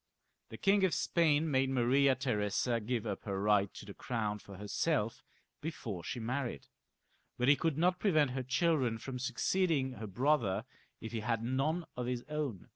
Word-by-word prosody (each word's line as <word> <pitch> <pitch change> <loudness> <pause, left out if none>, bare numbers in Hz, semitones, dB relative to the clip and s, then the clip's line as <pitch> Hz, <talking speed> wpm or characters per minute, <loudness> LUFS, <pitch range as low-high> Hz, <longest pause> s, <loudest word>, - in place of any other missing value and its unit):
The - - -8
King 200 0 +3
of 190 - +3
Spain 160 -2 +2
made 135 -1 +2
Maria 135 +2 +3
Theresa 115 -1 0
give 115 0 -2
up 100 -3 -4
her 100 -2 -2
right 100 -1 +3
to - - -9
the 100 - -9
crown 105 -4 -2
for 100 -1 -11
herself 110 - -1 0.4
before 115 - -5
she 125 - -4
married, 120 - -3 0.7
but 125 - +1
he 145 - +7
could 160 -1 -1
not 180 +2 +2
prevent 155 -9 +3
her 130 +1 -2
children 130 -2 +1
from 125 +3 -6
succeeding 135 +2 +1
her 110 -3 -7
brother 120 -1 +1 0.4
if 110 - -6
he 115 - -2
had 115 +1 -1
none 145 +8 0
of 125 -1 -3
his 125 -1 -2
own. 150 -10 -3
125 Hz, 175 wpm, -33 LUFS, 110-150 Hz, 0.7 s, he